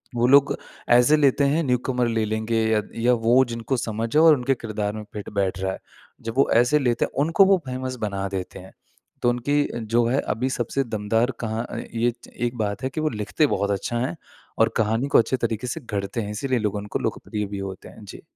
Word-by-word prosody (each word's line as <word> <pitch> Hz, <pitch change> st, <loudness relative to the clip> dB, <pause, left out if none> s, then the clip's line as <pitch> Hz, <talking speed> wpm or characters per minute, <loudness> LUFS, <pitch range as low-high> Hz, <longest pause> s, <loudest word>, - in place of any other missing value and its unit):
वो 120 Hz, +1 st, +2 dB
लोग 140 Hz, +2 st, +5 dB, 0.3 s
ऐसे 125 Hz, +5 st, +6 dB
लेते 140 Hz, -1 st, +3 dB
हैं 150 Hz, +4 st, +2 dB
न्यूकमर 125 Hz, -2 st, 0 dB
ले 115 Hz, -1 st, 0 dB
लेंगे 110 Hz, +1 st, -1 dB
या 110 Hz, -, +3 dB
त -, -, -17 dB
या 120 Hz, +2 st, +3 dB
वो 125 Hz, +3 st, +6 dB
जिनको 115 Hz, +2 st, -3 dB
समझ 115 Hz, +1 st, -3 dB
है 155 Hz, -, +6 dB
और 160 Hz, -2 st, +7 dB
उनके 130 Hz, +2 st, +1 dB
किरदार 105 Hz, -3 st, -3 dB
में 110 Hz, 0 st, -6 dB
फिट 105 Hz, -1 st, -6 dB
बैठ 95 Hz, -1 st, -1 dB
रहा 95 Hz, 0 st, -1 dB
है। -, -, -8 dB, 0.4 s
जब 115 Hz, 0 st, -5 dB
वो 135 Hz, -, +4 dB
ऐसे 120 Hz, +6 st, +4 dB
लेते 120 Hz, -4 st, +1 dB
हैं -, -, -10 dB
उनको 165 Hz, +5 st, +5 dB
वो 195 Hz, 0 st, +5 dB
फेमस 130 Hz, 0 st, -4 dB
बना 100 Hz, -2 st, -2 dB
देते 95 Hz, -1 st, -5 dB
हैं, 95 Hz, +1 st, -13 dB, 0.5 s
तो 120 Hz, -, +3 dB
उनकी 145 Hz, +5 st, +1 dB, 0.2 s
जो 115 Hz, +2 st, +1 dB
है 130 Hz, +4 st, +1 dB
अभी 125 Hz, +5 st, -2 dB
सबसे 130 Hz, +1 st, -1 dB
दमदार 110 Hz, +1 st, 0 dB
कहाँ 110 Hz, 0 st, -3 dB
अ, -, -, -6 dB, 0.2 s
ये 120 Hz, +1 st, +1 dB
च -, -, -13 dB
एक 120 Hz, 0 st, -2 dB
बात 105 Hz, -1 st, -2 dB
है 130 Hz, -, 0 dB
कि 155 Hz, +4 st, -4 dB
वो 155 Hz, -, +1 dB
लिखते 110 Hz, +6 st, 0 dB
बहुत 100 Hz, -6 st, 0 dB
अच्छा 100 Hz, +4 st, -2 dB
हैं 130 Hz, +7 st, -2 dB, 0.4 s
और -, -, +5 dB
कहानी 110 Hz, +4 st, +1 dB
को -, -, +4 dB
अच्छे 120 Hz, +3 st, +1 dB
तरीके 115 Hz, 0 st, -2 dB
से 160 Hz, +7 st, -4 dB
घड़ते 105 Hz, -1 st, -3 dB
हैं। 105 Hz, -1 st, -5 dB
इसीलिए 125 Hz, +4 st, -1 dB
लोग 105 Hz, -2 st, -1 dB
उनको 105 Hz, 0 st, -3 dB
लोकप्रिय 105 Hz, -1 st, -3 dB
भी 100 Hz, 0 st, -6 dB
होते 95 Hz, -1 st, -7 dB
हैं। -, -, -14 dB
जी। 95 Hz, -, -10 dB
115 Hz, 230 wpm, -24 LUFS, 105-130 Hz, 0.5 s, और